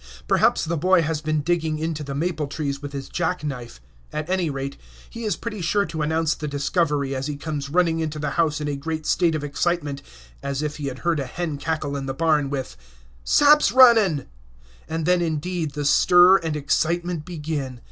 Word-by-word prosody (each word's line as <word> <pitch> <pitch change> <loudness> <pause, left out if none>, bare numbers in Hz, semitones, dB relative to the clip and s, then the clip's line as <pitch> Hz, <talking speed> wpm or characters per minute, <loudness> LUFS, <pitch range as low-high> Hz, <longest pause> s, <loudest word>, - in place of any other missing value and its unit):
Perhaps - - +3
the 165 +1 -1
boy 180 +2 +3
has 155 0 -2
been 155 0 -1
out 145 - -3
digging 160 -2 0
into 155 -1 -3
the 140 -1 -5
maple 155 -1 -1
trees 140 -1 -4
with 145 -1 -6
his 140 -1 -6
jack 175 -1 -2
knife; 125 - -6 0.3
at 155 0 -4
any 185 -3 +1
rate, 135 0 -4 0.3
he 230 -1 -7
is 210 - 0
pretty 215 -4 -6
sure 200 +4 +1
to 160 -2 -5
announce 160 +1 +1
the 150 - -5
discovery 145 -1 0
as 130 +1 -3
he 145 -1 -4
comes 145 -2 -4
running 165 0 +2
into 155 -1 -3
the 150 0 -2
house 160 -3 +1
in 150 - -3
a 145 - -1
great 155 +2 -4
state 170 -3 +2
of 150 - -3
excitement 145 -1 -1 0.4
as 140 +1 -3
if 150 0 -3
he 145 -2 -4
had 130 -1 -5
heard 170 -3 +2
a 135 - -3
hen 160 0 -4
cackle 155 -1 -2
in 135 -1 -4
the 135 - -3
barn 150 -3 +2
with 135 - -4 0.5
"Sap's 290 - +5
runnin'!" 225 - +6 0.6
And 160 0 -2
then, 180 0 +3
indeed, 160 -1 -2
the 145 -1 -3
stir 180 +6 +6
and 160 -3 -3
excitement 170 +3 0
begin. 150 -6 -5
155 Hz, 205 wpm, -23 LUFS, 145-170 Hz, 0.6 s, runnin